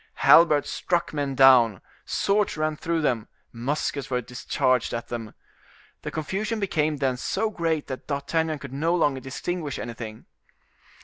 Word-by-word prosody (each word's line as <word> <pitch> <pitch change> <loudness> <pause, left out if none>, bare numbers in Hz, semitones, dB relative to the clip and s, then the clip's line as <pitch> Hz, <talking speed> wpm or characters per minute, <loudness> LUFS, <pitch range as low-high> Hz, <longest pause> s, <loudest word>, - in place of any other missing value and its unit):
Halberds 155 -3 +6
struck 175 -2 -1
men 140 -2 -2
down, 125 -7 +6 0.3
swords 200 -3 0
ran 155 0 0
through 165 +2 -1
them, 120 -6 0 0.2
muskets 140 +3 -3
were 125 -1 0
discharged 125 0 0
at 115 - -6
them. 115 -3 -6 0.7
The - - -5
confusion 205 +8 -3
became 155 -6 0
then 135 -3 0
so 215 - -1
great 165 -5 -1
that 130 - -7
D'Artagnan 155 +2 -1
could 140 -2 -9
no 165 +5 +1
longer 145 -6 +1
distinguish 145 +3 -4
anything. 115 -2 -7
145 Hz, 140 wpm, -25 LUFS, 130-165 Hz, 0.7 s, Halberds